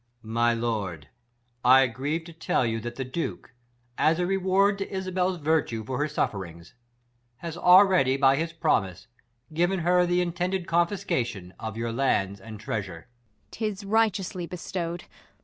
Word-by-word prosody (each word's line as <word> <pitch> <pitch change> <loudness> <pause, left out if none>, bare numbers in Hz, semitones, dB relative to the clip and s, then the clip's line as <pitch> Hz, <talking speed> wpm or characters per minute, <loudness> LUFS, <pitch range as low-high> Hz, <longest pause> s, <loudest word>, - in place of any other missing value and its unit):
My 115 +2 +1
lord, 105 -10 -3 0.5
I 130 +2 +7
grieve 140 +7 -3
to 170 0 -12
tell 155 -5 0
you, 115 -1 -1
that 120 +2 -6
the 130 - -4
Duke, 130 0 -5 0.5
As 160 +1 +3
a 180 - 0
reward 195 +2 +2
to 195 - -4
Isabella's 185 -1 -1
virtue 150 -8 0
for 130 +3 -3
Her 150 - +1
suff 150 - -1
rings, 85 -4 -9 0.6
has 165 +5 -7
already, 180 -6 +5
by 135 -1 +5
his 165 +3 -2
jiromise, 95 - 0 0.5
Given 175 +3 +1
her 180 +1 +3
th' 175 0 +1
intended 180 +1 -1
confiscation 150 - -1
of 110 -1 -5
Your 115 0 -2
lands 100 -6 0
and 110 0 -9
treasure. 100 -6 -5
Ang. 120 -3 -42
'Tis 210 -3 -4
righteously 195 -4 0
bestow'd. 175 -1 -5
155 Hz, 150 wpm, -26 LUFS, 115-180 Hz, 0.6 s, I